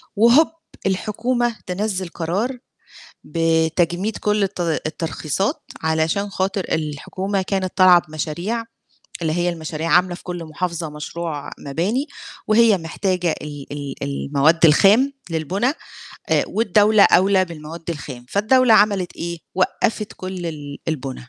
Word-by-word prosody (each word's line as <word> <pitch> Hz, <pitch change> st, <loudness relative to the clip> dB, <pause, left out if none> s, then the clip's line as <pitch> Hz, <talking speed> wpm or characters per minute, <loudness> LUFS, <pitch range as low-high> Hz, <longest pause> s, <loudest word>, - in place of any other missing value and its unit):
وهوب 235 Hz, +9 st, +6 dB, 0.4 s
الحكومة 235 Hz, +5 st, 0 dB
تنزّل 190 Hz, 0 st, -2 dB
قرار 195 Hz, +11 st, -2 dB, 0.7 s
بتجميد 165 Hz, +5 st, +1 dB
كلّ 210 Hz, 0 st, +1 dB
الت 195 Hz, -2 st, -2 dB
الترخيصات 165 Hz, +2 st, -2 dB, 0.2 s
علشان 160 Hz, +6 st, 0 dB
خاطر 190 Hz, 0 st, -1 dB
الحكومة 185 Hz, +6 st, -2 dB
كانت 185 Hz, -1 st, -2 dB
طالعة 180 Hz, -2 st, +7 dB
بمشاريع 170 Hz, +9 st, -3 dB, 0.6 s
اللي 155 Hz, -, 0 dB
هي 175 Hz, +2 st, +1 dB
المشاريع 160 Hz, -1 st, -3 dB
عاملة 180 Hz, 0 st, +4 dB
في -, -, -11 dB
كلّ 175 Hz, -2 st, -5 dB
محافظة 165 Hz, 0 st, -3 dB
مشروع 150 Hz, 0 st, -5 dB
مباني 190 Hz, -, -1 dB, 0.4 s
وهي 215 Hz, -2 st, +5 dB
محتاجة 175 Hz, 0 st, -1 dB
ال 145 Hz, -2 st, -7 dB
ال 145 Hz, -1 st, -5 dB
المواد 140 Hz, +4 st, +2 dB
الخام 205 Hz, -, +5 dB, 0.2 s
للبُنَا 190 Hz, -, 0 dB, 0.6 s
آآ -, -, +3 dB
والدولة 210 Hz, 0 st, +4 dB
أوْلى 190 Hz, +1 st, +5 dB
بالمواد 165 Hz, -1 st, -9 dB
الخام، 135 Hz, -6 st, -7 dB
فالدولة 230 Hz, -, +4 dB
عملت 200 Hz, -4 st, +3 dB
إيه، 170 Hz, 0 st, -4 dB, 0.2 s
وقّفت 210 Hz, +3 st, 0 dB
كلّ 185 Hz, -2 st, -5 dB
ال 145 Hz, -3 st, -6 dB
البنا. 135 Hz, -4 st, -4 dB
175 Hz, 120 wpm, -21 LUFS, 160-205 Hz, 0.7 s, طالعة